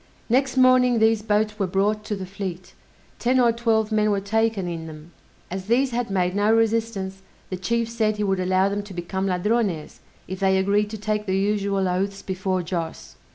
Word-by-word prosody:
Next 265 +3 +2
morning 255 -1 +5
these 220 -1 +3
boats 210 0 0
were 195 - +1
brought 205 +3 0
to 210 - -2
the 190 -1 -6
fleet; 185 -2 -6 0.5
ten 255 +2 +2
or 240 -2 +5
twelve 225 -2 +1
men 215 0 +2
were 200 -1 +1
taken 220 -1 0
in 165 -2 -5
them. 155 +1 -11 0.4
As 190 0 -4
these 255 +3 +2
had 240 -1 -2
made 180 -1 0
no 205 +1 +3
resistance, 225 -4 0 0.3
the - - -1
chief 230 +6 -1
said 220 -2 0
he 210 - -1
would 195 -2 0
allow 185 +1 +2
them 200 +1 -2
to 200 -2 -11
become 190 +2 -3
Ladrones, 190 -3 -1 0.3
if 185 +1 -6
they 190 -1 +3
agreed 205 +2 +1
to 220 - -6
take 210 0 -2
the 190 0 +1
usual 200 -1 0
oaths 195 +2 -2
before 185 -1 -2
Joss. 165 -1 -5
205 Hz, 195 wpm, -23 LUFS, 190-225 Hz, 0.5 s, morning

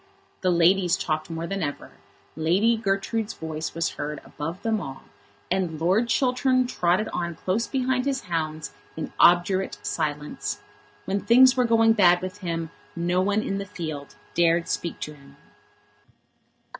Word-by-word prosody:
The 185 - +2
ladies 175 +1 +4
talked 155 0 -2
more 165 0 -4
than 195 +2 -3
ever, 145 -3 -4 0.4
Lady 185 +9 +3
Gertrude's 215 +1 -1
voice 160 0 -5
was 165 0 0
heard 150 +1 -5
above 165 +6 -6
them 220 -2 0
all, 135 -4 -8 0.5
and 180 -4 -1
Lord 190 +8 +2
Chiltern 255 0 +2
trotted 190 -3 +1
on 170 -1 -3
close 195 +8 -1
behind 255 -1 0
his 275 -1 0
hounds 155 -3 -3 0.2
in 160 - -5
obdurate 180 +2 +4
silence. 150 -2 -3 0.5
When 195 +1 0
things 255 +2 +6
were 250 -1 +3
going 225 -1 +5
bad 180 -5 +5
with 185 +2 -6
him 165 -3 -3 0.2
no 175 +2 +1
one 205 +3 +1
in 195 - -2
the - - -3
field 155 -6 -6 0.2
dared 170 0 +3
to - - -4
speak 170 - -3
to 150 - -5
him. 140 -1 -18
180 Hz, 155 wpm, -25 LUFS, 165-220 Hz, 0.5 s, things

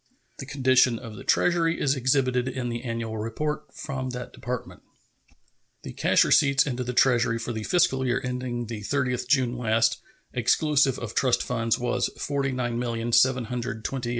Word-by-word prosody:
The 135 - -7
condition 130 -3 +3
of 115 -2 -9
the - - -10
Treasury 170 -1 +2
is 140 0 +2
exhibited 130 -1 +1
in 130 -2 -3
the 120 0 -4
annual 115 -2 -4
report 150 +8 -3
from 130 -3 -5
that 125 -1 -7
Department. 125 0 -6 1.0
The - - -7
cash - - +3
receipts 140 -1 +4
into 125 -3 -3
the 125 - -3
Treasury 120 -2 +3
for 115 +1 -4
the 110 - -4
fiscal 135 -3 +2
year 125 0 +1
ending 125 -1 -3
the 110 -2 -6
30th 125 +1 -1
June 125 -3 +1
last, 115 -1 +2 0.3
exclusive 135 +2 +2
of 115 -2 -6
trust 130 -3 +2
funds, 115 -2 0
were 120 0 -1
$49,728,386. 125 -2 -1
125 Hz, 150 wpm, -26 LUFS, 120-130 Hz, 1.0 s, receipts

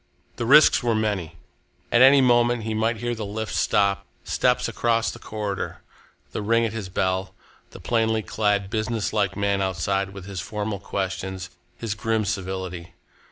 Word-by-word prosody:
The 115 - -2
risks 150 +4 +7
were 120 -3 +1
many. 100 -7 -1 0.6
At 120 - +5
any 135 +1 +8
moment 120 -2 +3
he 110 0 -2
might 110 +1 0
hear 120 +2 -2
the 110 -2 -5
lift 110 +2 -4
stop, 100 -1 +2 0.2
steps - - +1
across 115 -1 +1
the 120 - -11
corridor, 105 -3 -4 0.5
the - - -3
ring 115 +2 +2
at 110 - -3
his 105 -4 -5
bell, 95 +1 -1 0.3
the - - -12
plainly 110 -2 +1
clad, 100 -2 0
businesslike 110 -3 -1
man 100 -1 +1
outside, 95 +1 -1
with 95 -1 -10
his 95 -3 -5
formal 105 +1 -4
questions, 95 -1 -4 0.3
his 115 -3 -3
grim 110 0 -1
civility. 95 -3 -4
105 Hz, 160 wpm, -24 LUFS, 95-115 Hz, 0.6 s, any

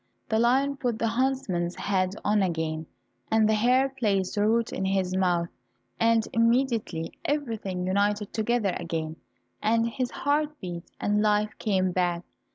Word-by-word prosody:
The 220 - +2
lion 270 +4 +2
put 245 -4 -1
the 230 0 0
huntsman's 225 -9 0
head 190 -1 0
on 210 0 +3
again, 160 -3 -2 0.4
and 220 -1 +4
the 220 - +3
hare 250 +5 +3
placed 210 -8 -1
the 205 0 +2
root 230 +1 +1
in - - -2
his 190 -1 0
mouth, 175 -2 +1 0.5
and 230 -1 +3
immediately 230 -8 +1
everything 225 -11 -2
united 205 +2 0
together 220 -3 0
again, 160 -1 -4 0.4
and 230 +2 +2
his 250 +1 -2
heart 295 +1 -1
beat, 175 -2 -7
and 210 0 +1
life 210 0 +2
came 190 -3 +1
back. 175 -1 0
210 Hz, 150 wpm, -27 LUFS, 185-235 Hz, 0.5 s, and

